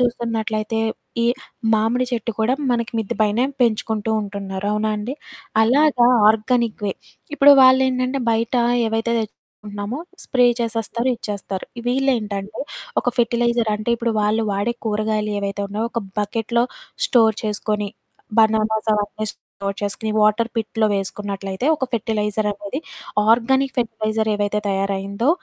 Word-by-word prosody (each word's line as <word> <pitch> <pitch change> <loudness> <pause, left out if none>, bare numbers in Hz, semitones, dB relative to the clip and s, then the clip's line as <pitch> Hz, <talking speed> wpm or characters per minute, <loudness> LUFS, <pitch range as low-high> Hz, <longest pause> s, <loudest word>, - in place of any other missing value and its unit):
చూస్తున్నట్లయితే 225 -2 -1 0.4
ఈ - - +2 0.5
మామిడి 225 +3 +2
చెట్టు 235 -1 -2
కూడా 220 +3 +2 0.2
మనకి 235 -1 -1
మిద్ది 220 -3 -2
పైనే 215 +3 +3 0.2
పెంచుకుంటూ 220 -1 0
ఉంటున్నారు, 195 -1 -5
అవునా 215 +1 0
అండి! 215 +6 -4 0.5
అలాగా 255 +1 +4 0.2
ఆర్గానిక్ 225 0 0
వే. 195 - 0 0.4
ఇప్పుడు 285 0 +8
వాళ్ళేంటంటే, 260 0 +4
బయటా 230 +2 +1 0.2
ఏవైతే 225 +1 0
తెచ్చుకుంటున్నామో 210 +1 -7 0.3
స్ప్రే 250 -1 +3
చేసేస్తారు, 230 +2 -1
ఇచ్చేస్తారు. 200 -3 -5 0.2
వీళ్ళేంటంటే, 220 -6 -1 0.4
ఒక - - -12
ఫెర్టిలైజర్ 235 -1 +2
అంటే, 215 +3 -3
ఇప్పుడు 235 0 0
వాళ్ళు 215 +2 +1
వాడే 205 +4 -1
కూరగాయలు 215 0 0
ఏవైతే 200 0 -3
ఉన్నయో, 210 +3 -2
ఒక 235 - -1 0.2
బకెట్‌లో 225 +3 0 0.4
స్టోర్ 225 -3 +4
చేసుకొని, 210 -1 -1 0.5
బనానాస్ 220 0 +2
అవన్నీ 210 +1 -2
స్టోర్ 200 0 -7
చేసుకొని, 205 +2 -2
వాటర్ 215 +2 +3
పిట్‌లో 220 0 0
వేసుకున్నట్లయితే 195 +2 -3
ఒక 280 - -2
ఫెర్టిలైజరనేది, 210 0 -1 0.5
ఆర్గానిక్ 265 +4 +3
ఫెర్టిలైజర్ 220 -2 -1
ఏవైతే 205 0 0
తయారయిందో, 195 +4 -1
220 Hz, 120 wpm, -21 LUFS, 210-235 Hz, 0.5 s, ఇప్పుడు